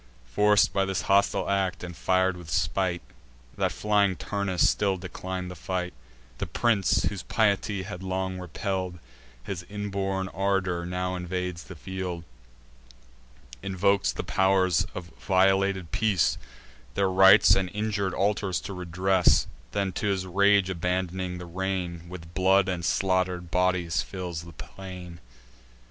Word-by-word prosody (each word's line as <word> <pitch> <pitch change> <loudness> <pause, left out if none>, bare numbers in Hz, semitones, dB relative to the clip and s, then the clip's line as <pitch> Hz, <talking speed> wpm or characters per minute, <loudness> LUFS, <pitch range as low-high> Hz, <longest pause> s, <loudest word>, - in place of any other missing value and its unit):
Forced 105 +12 +3
by 100 - +2
this 95 -4 -2
hostile 100 +1 +2
act, 95 -2 0
and 90 -1 -6
fir'd 95 +2 +2
with 85 -3 -10
spite, 90 +2 0 0.5
That - - 0
flying 100 -2 +2
Turnus 100 -3 0
still 100 -2 +1
declin'd 90 0 -5
the - - -8
fight, 90 +1 -3 0.5
The - - -2
Prince, 100 +3 +2
whose 100 -3 -2
piety 100 -2 +1
had 95 -1 -7
long 95 0 -3
repell'd 90 0 -3 0.5
His 85 +4 -5
inborn 100 -2 -2
ardour, 95 -2 -1
now 90 +1 -2
invades 90 -2 -4
the - - -10
field; 90 -3 -5 1.4
Invokes 100 +1 +1
the - - -5
pow'rs 95 -2 +2
of 85 -2 -7
violated 95 -2 +2
peace, 105 -6 +2 0.6
Their 95 -1 +2
rites 95 +1 +7
and 95 -1 +1
injur'd 105 -2 -2
altars 100 -3 0
to 100 - -6
redress; 90 +1 +2 0.3
Then, 100 +4 -1
to 105 - -2
his 95 -2 0
rage 100 +1 +3
abandoning 90 +1 -2
the 90 - -7
rein, 90 -1 -3
With 85 -2 -10
blood 95 +2 +4
and 90 -2 -2
slaughter'd 90 -1 0
bodies 90 -2 +1
fills 90 -4 -5
the 85 - -11
plain. 90 -3 -9
95 Hz, 135 wpm, -27 LUFS, 90-95 Hz, 1.4 s, rites